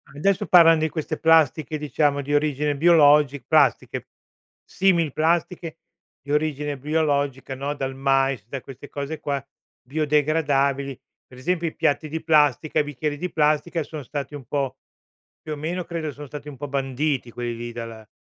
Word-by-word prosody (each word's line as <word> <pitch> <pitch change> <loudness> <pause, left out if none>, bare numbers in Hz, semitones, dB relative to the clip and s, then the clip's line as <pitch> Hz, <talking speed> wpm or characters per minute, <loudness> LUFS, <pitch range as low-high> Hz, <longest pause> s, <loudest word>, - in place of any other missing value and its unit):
Adesso 195 +6 +1
parlan 165 -2 +7
di 160 0 0
queste 155 0 -4
plastiche, 160 -1 +3
diciamo, 145 -1 0
di 145 +2 -3
origine 145 0 +1
biologi 145 -3 +5
plastiche, - - +2 0.6
simil 170 -6 +1
plastiche 165 +1 0 0.4
di 140 - -8
origine 150 -1 -1
biologica, 145 -2 -1
no, 140 +2 -3
dal 135 -2 -3
mais, 135 -3 +1
da 135 +3 -5
queste 135 +2 -11
cose 145 +2 -5
qua, 140 -1 -3 0.4
biodegradabili. 140 -2 0 0.3
Per 125 - -15
esempio 170 +5 -1
i 160 - -6
piatti 155 +2 0
di 160 +2 -4
plastica, 155 0 +3
i - - +3
bicchieri 145 +1 -3
di 180 +3 -4
plastica 155 +2 +1
sono 155 0 -7
stati 140 +1 -6
un 145 -3 -8
po' 135 +1 -2 0.6
più 155 - -7
o - - -8
meno 170 +5 -3
credo 165 -3 -4
sono 145 +2 -9
stati 145 +1 -9
un 145 - -8
po' 145 - -5
banditi 135 -1 -1
quelli 120 0 -4
lì 120 0 -6
dalla 115 -2 -8
145 Hz, 160 wpm, -23 LUFS, 135-155 Hz, 0.6 s, parlan